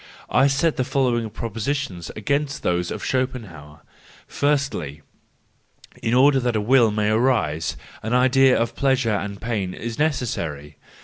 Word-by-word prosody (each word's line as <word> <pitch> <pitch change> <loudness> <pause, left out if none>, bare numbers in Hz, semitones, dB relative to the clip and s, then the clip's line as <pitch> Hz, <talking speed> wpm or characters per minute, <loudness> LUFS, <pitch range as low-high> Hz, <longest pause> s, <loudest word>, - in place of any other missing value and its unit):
I 135 - +5
set 145 +4 +1
the 130 - +1
following 125 -4 0
propositions 115 - -4
against 140 +6 -2
those 90 0 0
of - - -5
Schopen¬ 130 -6 -2
hauer:—Firstly, 75 - -4 1.0
in 115 - 0
order 135 +1 +5
that 120 -3 0
Will 120 +2 +4
may 105 0 0
arise, 110 - +1 0.2
an 110 +3 -1
idea 130 +1 +4
of 115 0 -1
pleasure 130 -5 +1
and 100 -1 -3
pain 105 -5 -3
is 115 +2 -6
necessary. 85 - -2
120 Hz, 130 wpm, -22 LUFS, 100-135 Hz, 1.0 s, I